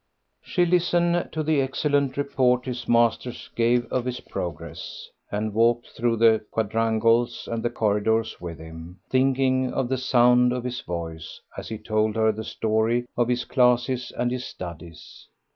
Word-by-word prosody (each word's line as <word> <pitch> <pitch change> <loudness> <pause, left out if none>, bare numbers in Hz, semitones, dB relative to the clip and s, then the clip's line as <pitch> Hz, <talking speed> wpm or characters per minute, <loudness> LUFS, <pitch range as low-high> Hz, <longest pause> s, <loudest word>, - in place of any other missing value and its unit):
She 180 -2 +1
listened 175 0 +2
to 155 0 -2
the 155 -2 +2
excellent 140 0 0
report 130 -3 +1
his 125 -2 -5
masters 120 +1 +1
gave 120 +1 +2
of 125 -1 0
his 125 -1 -3
progress, 85 -3 -7 0.2
and 105 +1 -2
walked 115 +2 +2
through 120 0 0
the 110 -1 +4
quadrangles 115 +2 +1
and 115 -1 -3
the 120 - 0
corridors 110 0 0
with 85 -2 -6
him, 80 +2 -11
thinking 130 0 +2
of 130 -2 -1
the 130 -1 0
sound 125 -1 +4
of 125 -1 -3
his 125 0 -4
voice 80 -2 -6 0.2
as - - -7
he 110 - -4
told 110 0 0
her 110 0 +3
the 110 +1 -6
story 110 +3 0
of 120 -1 +1
his 125 0 0
classes 125 0 +2
and 120 0 0
his 125 0 -3
studies. 85 -6 -10
120 Hz, 160 wpm, -24 LUFS, 110-130 Hz, 0.2 s, the